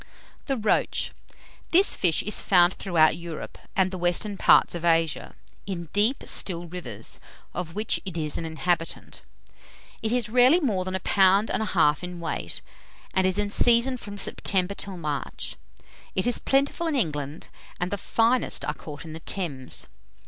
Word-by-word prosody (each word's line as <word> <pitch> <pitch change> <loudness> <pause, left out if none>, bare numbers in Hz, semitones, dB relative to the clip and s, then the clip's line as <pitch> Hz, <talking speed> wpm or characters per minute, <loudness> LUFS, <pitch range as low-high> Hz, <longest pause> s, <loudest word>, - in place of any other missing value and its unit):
THE 270 -2 0
ROACH. 215 -2 +1 0.6
This 375 +4 +5
fish 170 -4 +2
is 210 - -1
found 180 -1 +5
throughout 165 -5 +2
Europe, 170 -2 -7 0.2
and 185 -1 +2
the 185 - -5
western 175 +4 0
parts - - +5
of 170 -1 -5
Asia, 165 -2 +1 0.3
in 170 -4 -5
deep 215 +6 +2
still 175 -2 -1
rivers, 160 - -7 0.3
of 170 -2 -5
which 215 +1 0
it 185 -4 -6
is 155 -2 -1
an - - -3
inhabitant. 165 +1 -2 0.8
It 220 - -1
is 245 -2 +1
rarely 250 +8 +6
more 205 - 0
than 185 0 -3
a - - -1
pound 195 +3 +4
and - - 0
a - - 0
half 155 0 +4
in 180 -1 -6
weight, 120 - -3 0.5
and 190 0 +3
is 185 - 0
in 205 -1 -1
season 240 +4 +4
from 205 -4 -8
September 195 -1 +1
till 195 -1 -4
March. 150 -5 -4 0.6
It 190 - +1
is 245 - +1
plentiful 280 +5 +1
in 315 - 0
England, 150 - -2 0.3
and 180 +1 -2
the 205 - -1
finest 230 +5 +1
are 150 - -1
caught 145 +1 -9
in 160 - -8
the 160 - -7
Thames. 155 -7 -2
185 Hz, 170 wpm, -26 LUFS, 165-215 Hz, 0.8 s, rarely